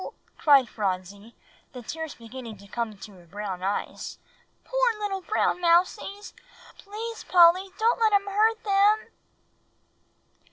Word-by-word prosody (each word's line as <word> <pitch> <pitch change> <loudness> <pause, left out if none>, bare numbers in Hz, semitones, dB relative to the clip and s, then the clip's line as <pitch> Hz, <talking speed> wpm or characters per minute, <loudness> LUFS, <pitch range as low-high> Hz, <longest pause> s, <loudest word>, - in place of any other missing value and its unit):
cried 280 -4 +5
Phronsie, 200 +1 -4 0.4
the 250 -2 -9
tears 320 +5 -6
beginning 230 -1 -10
to 200 +1 -16
come 235 +2 -3
into 210 0 -12
her 175 -2 -18
brown 195 0 -6
eyes; 195 +2 -4 0.5
"poor - - +1
little 395 -2 -3
brown 365 -2 0
mousies. 360 +4 +1 0.5
Please, 445 +3 -7
Polly 360 +2 +5
don't 455 +2 +2
let 445 -1 +3
him 400 -1 +3
hurt 435 +3 +1
them." 410 +1 +3
335 Hz, 125 wpm, -26 LUFS, -, 0.5 s, cried